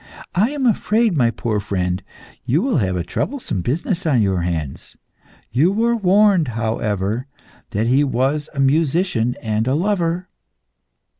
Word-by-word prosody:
I 205 +7 +2
am 285 -2 -2
afraid, 225 -3 +2
my 120 -5 +3
poor 115 -2 -2
friend, 95 -2 -2 0.4
you 135 - +1
will 260 -3 +1
have 95 -6 0
a 90 - -1
troublesome 105 - -3
business 170 - -2
on 130 -8 +3
your 95 -3 0
hands. 80 -5 -4 0.5
You 150 - +3
were 230 +3 +1
warned, 200 -4 +4
however, 110 +1 -1 0.4
that 105 +3 -1
he 130 +5 +3
was 140 +3 0
a - - -4
musician 140 -3 +1
and 110 +1 -1
a 130 - +2
lover. 180 0 0
135 Hz, 145 wpm, -20 LUFS, -, 0.5 s, warned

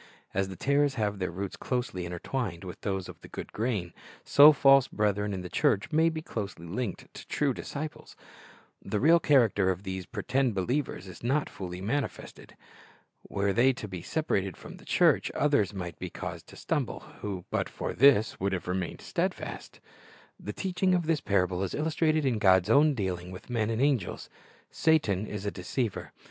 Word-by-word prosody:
As 95 0 0
the 95 - -7
tares 140 +4 +2
have 105 -3 -1
their 90 - -1
roots 95 +3 -5
closely 125 -8 -3
intertwined 90 +1 -4
with 90 -2 -8
those 95 -2 -2
of - - -11
the - - -11
good - - -8
grain, 105 -7 -2 0.3
so 145 +2 +8
false 135 -2 +5
brethren 105 -1 0
in 95 -2 -3
the 90 - -6
church 120 - +1
may 160 +2 +4
be 160 -1 -5
closely 100 - -5
linked 100 +3 -4
with - - -13
true 145 -3 +1
disciples. 150 +5 -7 0.7
The 105 - -2
real 165 +7 +6
character 115 - +3
of 95 +1 -2
these 95 -2 -5
pretended 120 +2 0
believers 110 -1 -1
is 90 - -11
not 140 +5 0
fully 90 -2 -6
manifested. 130 +8 -4 0.7
Were 100 0 0
they 130 +4 +4
to 110 - -7
be 90 -3 -6
separated 100 - -1
from - - -11
the - - -16
church, - - +3
others 140 -10 +2
might 90 -4 -6
be 90 - -4
caused - - -7
to - - -13
stumble, - - -2 0.2
who 95 -4 -4
but - - -1
for - - -4
this 120 -4 +4
would 95 +1 0
have 90 - -3
remained 90 -1 -3
steadfast. - - -4 0.6
The 105 - -5
teaching 185 - 0
of 175 -2 0
this 160 -2 +1
parable 90 -2 +1
is 95 - -2
illustrated 155 0 +1
in 120 -5 +1
God's 95 0 +4
own 145 +3 +5
dealing 90 -5 -3
with 95 +6 -10
men 110 -3 0
and 115 0 -1
angels. 135 -8 0 0.4
Satan 110 - +2
is 105 -1 -5
a 100 - -1
deceiver. 105 +5 -3
105 Hz, 180 wpm, -29 LUFS, 95-140 Hz, 0.7 s, so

